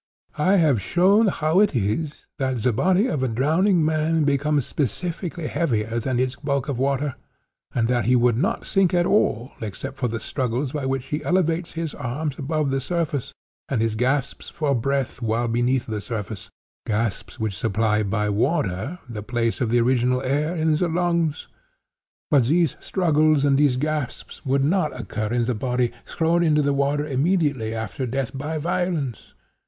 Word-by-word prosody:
I 185 +6 +4
have 150 - +3
shown 195 - +4
how 160 -1 +2
it 205 -8 +3
is 120 +8 -2
that 130 -4 -1
the 125 - +2
body 185 - +3
of 155 - -1
a 130 - +1
drowning 160 - +2
man 155 0 +1
becomes 145 -1 +1
specifically 170 - -3
heavier 115 -9 0
than 125 +1 -1
its 130 0 -1
bulk 140 -1 -1
of 135 -4 -2
water, 140 +1 0 0.6
and 115 -2 +2
that 120 -3 +1
he 125 +2 +4
would 120 -1 +3
not 180 - -1
sink 190 -3 +2
at 175 0 +3
all, 130 - +1
except 130 +6 -6
for 125 - 0
the 115 0 -3
struggles 125 +3 -2
by 145 -3 -3
which 135 -1 -2
he 150 -1 -3
elevates 175 -1 0
his 165 -3 -3
arms 140 +4 -4
above 150 0 -1
the 135 0 0
surface, 145 -3 -2 0.4
and 130 - 0
his 115 -1 +1
gasps 130 +4 -1
for 150 -3 -1
breath 135 +2 -1
while 115 +1 0
beneath 120 +2 +1
the 110 -2 -4
surface—gasps 110 0 -5
which 110 -3 -2
supply 105 +2 +1
by 105 +1 0
water 110 - 0
the 110 -3 -6
place 115 +2 -1
of 120 - +1
the 120 +1 +3
original 125 +1 +2
air 145 +6 0
in 160 -1 +2
the 175 +3 +1
lungs. 170 -2 0 0.9
But 135 -5 +4
these 165 0 +2
struggles 155 -5 +2
and 140 -1 +4
these 140 -3 +3
gasps 150 -2 -3
would 135 +1 +2
not 155 -5 0
occur 110 -3 -3
in 120 -1 +1
the 125 - 0
body 125 +1 0 0.2
'thrown 170 +1 +1
into 150 -3 +3
the 140 0 +2
water 140 +1 +1
immediately 140 -6 0
after 115 +4 -4
death 135 +1 -3
by 150 +4 -3
violence. 165 - -2
140 Hz, 170 wpm, -23 LUFS, 120-160 Hz, 0.9 s, I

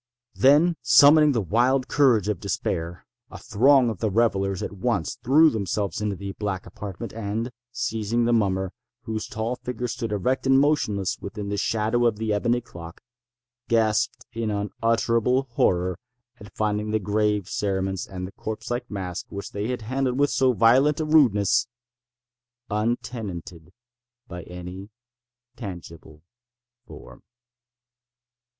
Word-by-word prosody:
Then, 150 +6 +4
summoning 145 +4 +6
the 115 - +1
wild 125 +7 +2
courage 125 -9 +3
of 105 -5 -1
despair, 85 +1 -3 0.2
a - - -9
throng 130 +4 +4
of 105 - -8
the 110 - 0
revellers 100 -3 +1
at - - -4
once 100 - -2
threw 155 +5 +5
themselves 100 -1 -2
into 105 -2 -1
the 100 +1 -6
black 100 -2 -4
apartment, 100 -4 -8
and, 115 +2 -3 0.2
seizing 115 -1 -1
the 120 - +2
mummer, 95 -4 0 0.3
whose 110 -3 -4
tall 115 +3 -3
figure 125 -1 -4
stood 115 -1 -4
erect 125 +7 -1
and 135 0 +5
motionless 110 -10 0
within 100 0 -6
the 100 - -1
shadow 115 +3 +1
of 115 - 0
the 110 -1 -1
ebony 120 +4 +1
clock, 85 -7 -12 0.6
gasped 110 -3 +1
in 115 -1 -2
unutterable 115 +4 +1
horror 90 -5 +1 0.4
at 105 -1 -12
finding 105 0 -1
the 110 - +1
grave 105 -1 0
cerements 95 -2 -2
and 95 +1 -7
corpse 110 +2 -6
like 120 +1 -3
mask 95 -4 -5
which 100 0 -7
they 100 +1 -3
handled 125 +3 -2
with 145 0 +2
so 130 -1 +3
violent 125 +6 +4
a 155 - -1
rudeness, 120 -6 +3 1.0
untenanted 105 -6 -4 0.6
by 90 -3 -7
any 90 +3 -9 0.7
tangible 85 -7 -10 0.6
form. - - -13
110 Hz, 135 wpm, -24 LUFS, 100-120 Hz, 1.0 s, summoning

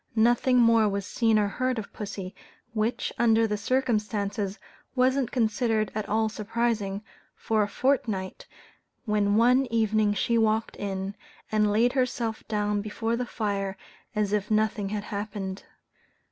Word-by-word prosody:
Nothing 240 +3 +4
more 230 -2 +5
was 200 -1 -2
seen 225 -1 +2
or 210 -1 +3
heard 255 +4 -1
of 220 - -6
pussy 200 -2 -6 0.4
which, 220 +2 -1
under 225 -1 +4
the 210 -1 -1
circumstances, 210 -3 -1 0.4
wasn't 255 0 +2
considered 225 -2 +1
at 215 -1 -4
all 220 +1 +2
surprising 215 -2 -2 0.3
for 220 -1 0
a 205 - +1
fortnight, 210 -6 -1 0.6
when 205 -2 +2
one 250 +4 +4
evening 215 -2 +2
she 230 +4 +1
walked 220 0 +1
in, 195 0 -3 0.4
and 210 -1 +3
laid 230 +4 +3
herself 240 -4 -1
down 210 -1 0
before 225 +2 -2
the 245 +1 -3
fire 200 -4 -2 0.4
as 210 -1 0
if 205 -1 0
nothing 215 -2 +1
had 205 0 -3
happened. 200 -2 -5
215 Hz, 140 wpm, -27 LUFS, 205-230 Hz, 0.6 s, more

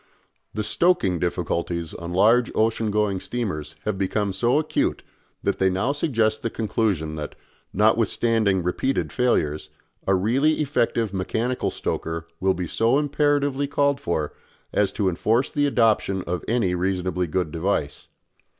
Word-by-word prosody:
The 110 - -1
stoking 105 - +2
difficulties 85 -1 -2
on 85 0 -6
large 115 +7 +4
ocean 110 0 +1
going 105 -2 +1
steamers 95 -10 -4
have 105 -3 -1
become 100 +1 0
so 120 +8 +2
acute 155 0 0 0.4
that - - 0
they 95 - +4
now 95 +9 0
suggest 115 -7 0
the 115 - -1
conclusion 100 -9 -1
that, 75 -1 -6 0.4
notwithstanding 110 -6 +2
repeated 90 +10 -1
failures, 75 - 0 0.4
a 95 - +4
really 125 +11 +2
effective 120 -7 0
mechanical 115 +6 -1
stoker 80 0 -3
will 95 0 +2
be 90 - -3
so 115 - +2
imperatively 145 -1 +1
called 140 0 +1
for 80 - -2 0.4
as 100 -2 +2
to 100 - 0
enforce 110 +8 +1
the 145 0 +1
adoption 110 -7 +2
of 90 +1 -3
any 110 -6 +1
reasonably 90 0 -1
good 85 0 -1
device. 80 -3 -2
105 Hz, 140 wpm, -24 LUFS, 90-120 Hz, 0.4 s, large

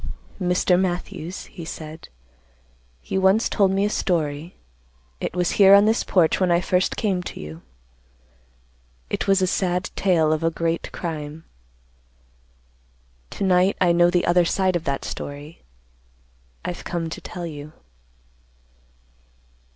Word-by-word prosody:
"Mr. 180 0 +2
Matthews," 180 -1 -3
he 175 - -10
said, 160 0 -8 0.9
"you 190 - -2
once 195 +4 +4
told 200 -3 +2
me 195 +1 +1
a - - +1
story. 160 -3 -1 0.6
It - - -4
was 180 -1 +1
here 195 0 +9
on 200 +1 +6
this 220 +2 +2
porch 170 -4 +2
when 185 -1 +2
I 170 0 +4
first 180 +1 0
came 195 -5 0
to - - -8
you. 80 +2 -8 1.5
It - - -2
was 195 -1 +3
a - - +5
sad 180 -1 -1
tale 165 -5 +2
of 155 +1 -2
a 165 - +3
great 165 0 -2
crime. 155 -2 -6 1.9
To - - -5
night 185 +1 +3
I 180 -2 +4
know 175 0 +4
the 175 0 +1
other 175 0 +4
side 185 +1 +1
of 170 - -2
that 140 0 -2
story. 145 +3 -7 1.0
I've 175 - -5
come 170 -1 -3
to - - -6
tell 175 -1 -7
you." 150 -2 -8
175 Hz, 140 wpm, -23 LUFS, 160-190 Hz, 1.9 s, here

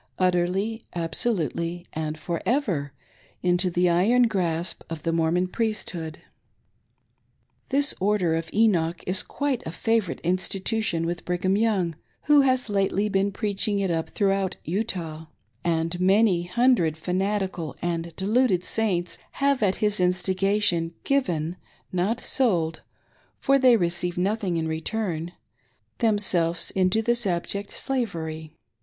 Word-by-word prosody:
Utterly, 185 +5 +1
absolutely, 170 - -1
and 155 0 -3
for 170 +2 -3
ever, 195 - 0 0.5
into 180 +1 +2
the 180 +1 +2
iron 200 +9 +4
grasp 175 -6 0
of 165 -2 -6
the 165 - 0
Mormon 165 +2 +2
Priesthood. 185 -7 -3 1.5
This 280 +1 +2
"Order 190 -4 +2
of 165 0 -3
Enoch" 175 -7 +2
is 185 +1 +1
quite 285 -4 -2
a - - -3
favor 225 +1 0
ite - - -16
institution 185 0 -1
with 175 +1 -3
Brigham 180 +2 0
Young, 200 -6 +1 0.3
who 295 -1 +6
has 255 -2 +2
lately 200 0 +1
been 195 0 +1
preaching 205 0 -1
it 195 -3 0
up 165 -1 -1
throughout 195 -2 0
Utah; 165 -4 -3 0.4
and 165 +1 0
many 190 -1 +3
hundred 185 -5 +2
fanatical 185 -2 -2
and 170 -1 -3
deluded 200 -2 +2
Saints 185 -5 0
have 275 -2 +1
at 195 -3 +2
his 210 -1 +1
instigation 185 -1 +1
given 175 - 0 0.2
— - - -35
not 225 +6 0
sold, 170 -11 +1 0.6
for 275 0 +3
they 255 -3 +6
receive 175 -1 0
nothing 190 -1 0
in 160 -1 -1
return 170 0 -3 0.3
— - - -43
themselves 190 -7 +1
into 190 +4 +2
this 240 -1 +2
abject 195 +3 -2
slavery. 160 - -3
185 Hz, 130 wpm, -25 LUFS, 170-215 Hz, 1.5 s, who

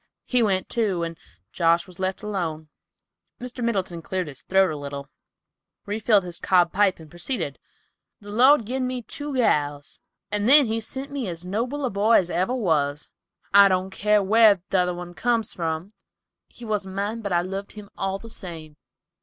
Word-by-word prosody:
He 250 -1 +2
went, 195 -4 +1
too, 200 -7 0
and 165 0 -4 0.4
Josh 170 +2 +2
was 185 -1 -13
left 190 +2 -2
alone." 165 -7 -3 0.7
Mr. 250 0 -6
Middleton 190 -7 -1
cleared 185 -1 -3
his 135 -2 -11
throat 190 -2 +3
a - - -4
little, 140 -1 -7 0.7
refilled 210 -1 +2
his 175 -1 -6
cob 175 -2 +3
pipe, 195 -2 +2
and 160 - -12
proceeded. 175 - -4 0.6
"The 205 -1 -11
Lord 255 +3 +5
gin 255 +3 -2
me 250 -1 -4
two 290 +4 -5
gals, 145 - 0 0.3
and 210 +2 0
then 290 0 +8
he 225 0 -1
sent 265 +5 -6
me 275 -6 -3
as 170 0 -5
noble 240 +9 -2
a 255 - -1
boy 205 +3 +2
as 180 -5 +4
ever 190 +8 0
was, 150 - 0 0.4
I 200 0 +9
don't 185 0 0
care 210 +1 +2
where 210 -2 +5
t'other 180 -1 0
comes 230 +1 0
from. 165 +2 -3 0.6
He 240 - -12
wasn't 200 -3 -3
mine, 210 +3 -2
but 200 -3 -4
I 175 -1 +3
loved 195 +2 -5
him 210 -1 -11
all 195 0 -2
the 230 - -12
same. 160 -7 -7
195 Hz, 175 wpm, -24 LUFS, 175-225 Hz, 0.7 s, I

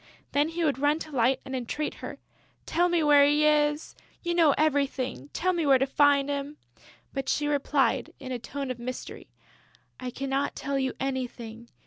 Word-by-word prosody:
Then 290 +2 +2
he 335 +1 -2
would 280 -3 0
run 290 +2 +3
to 315 -1 -8
Light 250 +2 +3
and 265 - -5
entreat 260 +5 -3
her: - - -6 0.5
"Tell 350 +1 +2
me 345 -2 +2
where 290 -1 +6
he 295 +1 +4
is!... 295 0 +2 0.3
You 345 -1 0
know 330 -4 +4
everything: 275 - 0
tell 370 +1 0
me 340 -2 0
where 275 -3 +5
to 265 - +1
find 280 0 +3
him!" 285 +1 -4 0.6
But 270 -1 -3
she 295 - +1
replied, 280 -3 +1
in 260 -2 -7
a 250 - -3
tone 275 +2 -5
of 245 - -6
mystery: 250 +1 -7 0.7
"I 255 -1 -4
cannot 275 +2 -2
tell 275 0 -2
you 265 -1 -1
anything. 240 -3 -4
280 Hz, 180 wpm, -27 LUFS, 260-300 Hz, 0.7 s, where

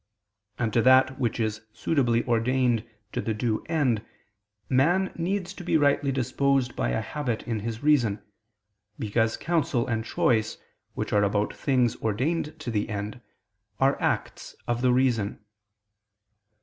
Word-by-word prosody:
And 115 -3 -1
to 115 - +4
that 130 +2 +5
which 120 -2 -1
is 110 -1 -1
suitably 120 -7 +1
ordained 120 0 +1 0.3
to - - -2
the 110 - -2
due 110 0 -1
end 130 -10 +1 0.6
man 175 +9 +2
needs 185 +2 -2
to 190 - -9
be 170 - +2
rightly 145 -1 +2
disposed 135 0 0
by - - 0
a - - 0
habit 130 -7 -3
in 115 -2 -1
his 115 +3 -5
reason, 125 -9 +3 0.8
because 115 +1 0
counsel 155 -8 0
and 115 -3 -1
choice, 110 -1 +1 0.4
which - - -3
are 105 - +4
about 105 +1 +1
things 125 -4 +1
ordained 150 +8 -1
to 120 - -4
the 105 0 -1
end, 105 +3 -5 0.6
are 135 +1 +2
acts - - -2
of 120 0 -1
the 125 -1 +3
reason. 125 -5 +1
120 Hz, 145 wpm, -26 LUFS, 110-140 Hz, 0.8 s, that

